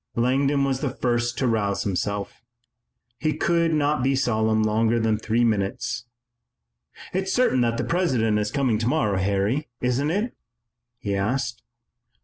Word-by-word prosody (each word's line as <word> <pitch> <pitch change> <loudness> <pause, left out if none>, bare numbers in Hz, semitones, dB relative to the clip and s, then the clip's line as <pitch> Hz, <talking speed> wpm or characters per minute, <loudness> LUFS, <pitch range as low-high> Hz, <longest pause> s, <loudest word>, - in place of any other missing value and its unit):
Langdon 135 +4 +2
was 135 -1 0
the 140 - -1
first 120 -2 -1
to 130 - +1
rouse 105 -4 0
himself. 100 +1 -3 0.8
He 155 -2 -1
could 170 0 +2
not 150 -2 +1
be 135 +2 +2
solemn 110 -4 +1
longer 110 +2 +2
than 110 -1 +1
three 115 +2 +1
minutes. 110 +2 -1 1.1
"It's 190 +1 -1
certain 245 - +3
that 115 -1 +1
the - - -1
President 125 -12 +1
is 105 0 -1
coming 125 -4 +1
tomorrow, 115 -5 +1
Harry, 100 +9 0
isn't 125 +4 0
it?" 210 +8 -1 0.6
he 100 -4 -3
asked. 120 +5 -1
120 Hz, 140 wpm, -24 LUFS, 110-140 Hz, 1.1 s, certain